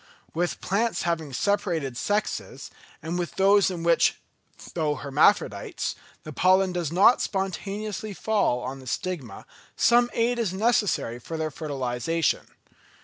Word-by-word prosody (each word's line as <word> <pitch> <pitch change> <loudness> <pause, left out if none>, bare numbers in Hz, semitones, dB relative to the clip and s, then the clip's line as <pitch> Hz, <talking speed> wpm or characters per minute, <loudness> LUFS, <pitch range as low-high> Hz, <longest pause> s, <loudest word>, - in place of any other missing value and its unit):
With 175 +2 -2
plants 220 +4 0
having 165 -4 -2
separated 160 - -1
sexes, 205 - -2 0.3
and 170 +2 -3
with 175 - -4
those 195 +1 +4
in 175 -3 -5
which, 170 -1 +3 0.5
though 155 -3 0
hermaphrodites, 145 +9 +1 0.3
the - - -8
pollen 185 +1 +3
does 175 -4 -2
not 195 +8 +5
spontaneously 200 +2 -3
fall 205 - +1
on 130 +2 -5
the 130 - -13
stigma, 145 - -4 0.3
some 240 +1 +4
aid 240 +1 +1
is 210 -6 -1
necessary 205 - +1
for 160 +6 -6
their 155 -1 -2
fertilisation. 140 +1 -1
175 Hz, 130 wpm, -26 LUFS, 150-205 Hz, 0.5 s, not